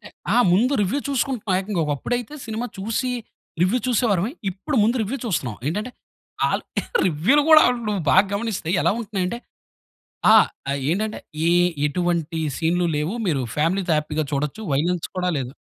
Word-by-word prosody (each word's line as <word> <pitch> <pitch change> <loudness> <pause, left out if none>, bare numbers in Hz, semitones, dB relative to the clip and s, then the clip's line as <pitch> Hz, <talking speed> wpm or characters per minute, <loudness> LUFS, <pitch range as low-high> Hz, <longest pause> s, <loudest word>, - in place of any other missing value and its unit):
అంటే 210 - -12 0.3
ఆ - - +3 0.2
ముందు 240 +9 +3
రివ్యూ 200 +10 0
చూసుకుంటున్నాం 250 -7 -1
ఏకంగా. 195 -3 -2
ఒకప్పుడైతే 240 - -2
సినిమా 225 +2 -3
చూసి 225 +5 -1 0.5
రివ్యూ 205 +8 +2
చూసేవార‌ము. 220 -5 +1 0.2
ఇప్పుడు 200 +10 -4
ముందు 235 +4 +2
రివ్యూ 235 +7 -3
చూస్తున్నాం. 130 - -2
ఏంటంటే 210 +9 -3 0.6
అల్ - - -1 0.4
రివ్యూలు 190 - +3
కూడా 310 -1 +9 0.2
నువ్వు 205 -5 -1
బాగా 190 +2 +6
గమనిస్తే 205 -6 -3
ఎలా - - +3
ఉంటున్నాయంటే, 205 -1 -3 1.0
ఆ - - +9 0.5
ఏంటంటే, 210 +6 -1 0.3
ఏ - - +3 0.4
ఎటువంటి 170 0 -1 0.2
సీన్లు 175 +2 +1
లేవు 160 +9 -2
మీరు 140 -6 +1
ఫ్యామిలీ‌తో 170 +4 +1
హ్యాపీగా 150 0 -2
చూడొచ్చు 150 +9 -2
వయలెన్స్ 170 +5 0
కూడా 180 0 0
లేదు. 130 -1 -4
190 Hz, 140 wpm, -22 LUFS, 165-230 Hz, 1.0 s, కూడా